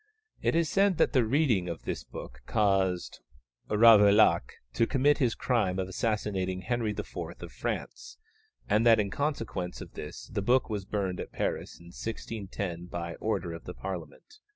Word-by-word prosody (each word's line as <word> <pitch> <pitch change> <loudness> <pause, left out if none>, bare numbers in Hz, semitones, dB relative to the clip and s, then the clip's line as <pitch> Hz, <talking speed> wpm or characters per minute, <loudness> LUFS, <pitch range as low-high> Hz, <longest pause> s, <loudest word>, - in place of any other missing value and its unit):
It - - +1
is 165 -1 +3
said 195 +1 +3
that - - +3
the 130 -4 +4
reading 115 - +2
of 85 - -6
this - - -4
book - - -10
caused 95 -4 +1 0.5
Ravaillac 105 - +6 0.2
to 115 - +2
commit 145 +2 +3
his 125 -5 +2
crime 105 -8 0
of 95 -1 -1
assassinating 95 -2 -1
Henry 120 0 -1
IV. 105 - -3 0.3
of - - -8
France, 465 +3 -5 0.5
and 105 +2 +3
that 115 -2 +6
in 100 -2 0
consequence 115 - -3
of - - -10
this - - -8
the - - 0
book 120 +3 +2
was 100 -3 -3
burned 95 -3 -2
at - - -6
Paris - - -3
in 85 0 -14
1610 100 -6 -5
by 85 -1 -5
order 95 -6 -2
of 85 - -9
the 90 - -7
Parliament. 95 - -7
105 Hz, 165 wpm, -29 LUFS, 95-120 Hz, 0.5 s, Ravaillac